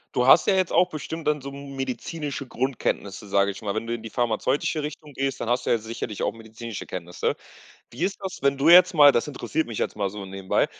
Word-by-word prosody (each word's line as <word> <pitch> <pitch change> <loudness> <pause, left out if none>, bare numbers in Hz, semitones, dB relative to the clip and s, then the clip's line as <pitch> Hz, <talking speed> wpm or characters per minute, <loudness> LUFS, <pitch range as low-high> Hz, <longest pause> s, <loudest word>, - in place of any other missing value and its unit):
Du 125 - +2
hast 155 +5 +7
ja 200 - +4
jetzt 185 -2 +1
auch 180 0 +4
bestimmt 160 +1 -6
dann 150 -1 +1
so 140 - -6
m 140 0 -9
medizinische 140 +2 -4
Grundkenntnisse, 120 -6 -2
sage 100 0 +2
ich 95 - -10
mal, 100 -1 -3
wenn 110 +1 -2
du 115 - -3
in 120 - -4
die 115 - -7
pharmazeutische 125 +7 0
Richtung 150 0 -7
gehst. 135 -1 -2
Dann 115 - -3
hast 120 +1 +1
du - - +1
ja 120 - +4
sicherlich 110 -1 -5
auch - - +1
medizinische 115 0 -8
Kenntnisse. 90 -1 -3 0.6
Wie 120 - -7
ist 195 +2 0
das, 190 -2 -6
wenn 140 0 +2
du 140 +4 +3
jetzt 180 +1 +8
mal- 145 -4 +8
das 120 - 0
interessiert 150 +1 -2
mich 115 - -5
jetzt - - -1
mal 100 -2 -1
so 105 0 -7
nebenbei- 95 0 0
130 Hz, 240 wpm, -25 LUFS, 110-150 Hz, 0.6 s, jetzt